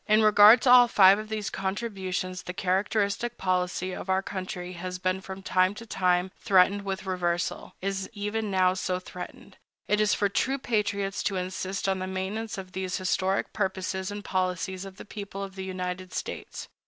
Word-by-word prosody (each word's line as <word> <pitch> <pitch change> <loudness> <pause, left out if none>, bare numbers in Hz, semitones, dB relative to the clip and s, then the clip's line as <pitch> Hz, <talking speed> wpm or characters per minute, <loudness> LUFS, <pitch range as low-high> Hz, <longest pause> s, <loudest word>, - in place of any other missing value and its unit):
In 215 0 +5
regard 215 +2 +8
to 250 - +5
all 250 -1 +9
five 195 -3 +6
of 215 0 -7
these 215 -1 -3
contributions, 190 -2 -3
the 180 - -7
characteristic 200 +5 0
policy 185 0 -1
of 185 - -7
our 190 +1 +2
country 185 -2 -5
has 180 +1 -5
been 185 +1 -1
from 190 0 -8
time 185 +1 +2
to 230 - -9
time 185 -3 +1
threatened 195 +1 +4
with 195 0 -4
reversal—is 185 +2 -2
even 210 +1 -3
now 185 -1 +3
so 185 -1 -1
threatened. 180 0 -10 0.3
It 210 0 +2
is 210 -1 +3
for 205 - +2
true 260 +7 0
patriots 205 -5 -1
to 195 - 0
insist 185 +1 -3
on 190 -1 +1
the 185 - -3
maintenance 195 +4 -3
of 190 -1 -7
these 185 0 -3
historic 185 +1 0
purposes 190 -1 -2
and 205 0 -6
policies 185 0 -2
of 195 0 -10
the - - -10
people 200 -1 -6
of 195 -1 -7
the 190 0 -6
United 185 0 -5
States. - - -5
190 Hz, 180 wpm, -27 LUFS, 185-205 Hz, 0.3 s, all